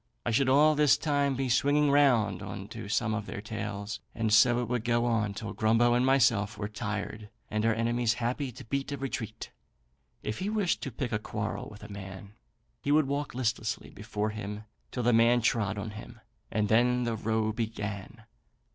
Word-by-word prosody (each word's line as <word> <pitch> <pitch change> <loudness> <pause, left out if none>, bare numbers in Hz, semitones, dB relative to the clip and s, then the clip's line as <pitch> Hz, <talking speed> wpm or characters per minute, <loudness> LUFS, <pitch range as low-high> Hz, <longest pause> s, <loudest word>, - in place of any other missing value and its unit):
I 120 - +1
should 130 +3 +3
all 150 +3 +6
this 150 -2 +4
time 145 -2 +1
be 135 0 -1
swinging 145 +4 +3
round 120 -9 +3
on 95 0 -6
to 110 -2 -7
some 110 0 +1
of 105 -1 -3
their - - -5
tails, 105 -1 -5 0.2
and 110 -2 0
so 120 +2 +6
it 120 - -2
would 120 -1 -1
go 120 0 +1
on 110 -4 0
till 105 -2 -5
Grumbo 115 +2 +3
and 120 +1 +3
myself 120 -6 +3
were 105 - -3
tired 105 0 -5 0.2
and 105 0 0
our 115 - +4
enemies 120 0 +1
happy 125 +3 -2
to 115 - -11
beat 140 +4 -2
a 140 - -2
retreat. 125 -5 -5 0.7
If 110 - -3
he 195 - -2
wished 210 -5 0
to 135 - -4
pick 125 +2 -4
a 105 - 0
quarrel 105 -1 -4
with 105 0 -12
a - - -8
man, 95 0 -9 0.5
he 140 - -1
would 155 0 +5
walk 140 -1 -2
listlessly 115 -3 -2
before 105 0 -3
him 105 0 -6 0.3
till 125 - -3
the 120 +1 +3
man 115 +2 +5
trod 110 -3 +1
on 105 +1 -4
him, 110 +2 -10 0.3
and 105 -1 0
then 125 +3 +3
the 115 -1 -1
row 110 0 0
began. 105 -3 -5
115 Hz, 195 wpm, -29 LUFS, 105-125 Hz, 0.7 s, all